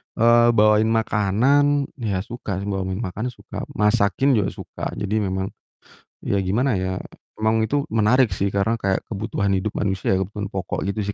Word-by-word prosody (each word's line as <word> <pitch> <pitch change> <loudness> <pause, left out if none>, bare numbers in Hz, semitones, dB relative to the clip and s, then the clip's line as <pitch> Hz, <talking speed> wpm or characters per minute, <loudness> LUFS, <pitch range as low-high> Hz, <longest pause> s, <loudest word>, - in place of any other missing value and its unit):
eee, 120 +1 +5
bawain 105 +1 +4
makanan, 125 +7 +2 0.2
ya 100 -6 -1
suka 105 -4 -5
sih 100 - -5
bawa 95 -1 -1
min 95 +4 -3
makanan 105 +5 -3
suka, - - -8
masakin 105 +5 +2
juga 100 - +1
suka - - -7
jadi 105 +1 -2
memang, 95 0 -2 0.7
ya 100 - +1
gimana 115 +8 +1
ya, 95 0 -2 0.4
emang 110 +1 +2
itu 140 +5 -1
menarik 115 +3 +4
sih, 100 +2 0
karena 100 +3 +1
kayak 95 -1 0
kebutuhan 100 -1 -2
hidup 95 +3 -1
manusia, 95 -1 0
kebutuhan 100 +1 -4
pokok 95 -2 -4
gitu 105 +2 -2
sih, 105 - -3
105 Hz, 165 wpm, -22 LUFS, 95-115 Hz, 0.7 s, eee